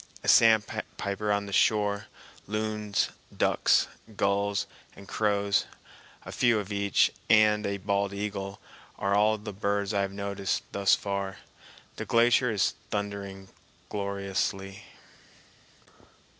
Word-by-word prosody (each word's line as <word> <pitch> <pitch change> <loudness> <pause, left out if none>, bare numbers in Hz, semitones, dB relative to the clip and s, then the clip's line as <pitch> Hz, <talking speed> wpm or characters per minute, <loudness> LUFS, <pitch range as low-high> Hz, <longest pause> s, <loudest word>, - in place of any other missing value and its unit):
A - - -6
sandpiper 105 -2 +3
on 100 0 0
the 100 - -7
shore, 105 0 +2 0.4
loons, 105 -1 -1 0.3
ducks, - - +3 0.3
gulls, 100 0 +1 0.3
and 100 - -13
crows, 100 -1 +1 0.6
a - - -7
few 120 -2 +3
of 105 -1 -4
each, 100 -1 +2 0.2
and 105 -1 +5
a 100 0 -2
bald 100 +1 -1
eagle 100 -1 -4 0.4
are 100 0 0
all 105 +2 +3
the 105 0 -7
birds 100 +1 -1
I 100 - +2
have 100 0 -2
noticed 100 -1 -2
thus 100 -1 +3
far. 100 -1 -3 0.6
The - - -4
glacier 120 +2 +4
is 105 -4 +1 0.2
thundering 100 -2 -4 0.4
gloriously. 100 -1 -3
100 Hz, 115 wpm, -28 LUFS, 100-105 Hz, 0.6 s, and